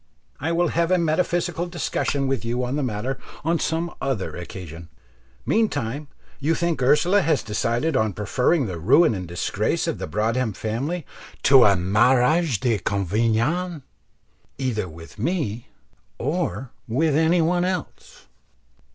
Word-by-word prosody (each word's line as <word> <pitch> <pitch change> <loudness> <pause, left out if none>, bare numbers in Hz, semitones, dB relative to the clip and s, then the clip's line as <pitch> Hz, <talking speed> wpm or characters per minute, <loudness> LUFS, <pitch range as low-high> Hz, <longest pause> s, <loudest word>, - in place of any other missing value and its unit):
I 160 +4 -1
will 175 +1 +2
have 170 0 +1
a 185 - +4
metaphysical 175 +1 0
discussion 145 -4 -1
with 135 -3 -1
you 120 +2 -1
on 125 +3 -2
the 150 - 0
matter 125 +1 -3 0.3
on 165 0 +2
some 165 +2 -1
other 130 -8 -2
occasion. 85 -2 -8 0.6
Meantime 145 - 0 0.3
you 155 +4 +1
think 170 -4 -1
Ursula 175 +10 +4
has 160 -4 +1
decided 115 +8 -1
on 110 -2 +1
preferring 125 - +1
the 90 -5 -5
ruin 125 - +5
and 90 -3 -5
disgrace 85 0 -1
of - - -2
the - - -4
Broadhem 110 +5 0
family 135 - -3 0.4
to 135 -3 +7
a 100 -1 +5
mariage 125 - +3
de 115 -4 +1
convenance 115 - 0 0.7
either 110 -8 -2
with 80 +1 -13
me 135 - -2 0.5
or 145 -3 -2 0.2
any 160 +6 +3
one 175 +2 +1
else?" 190 - -5
135 Hz, 135 wpm, -23 LUFS, 110-165 Hz, 0.7 s, to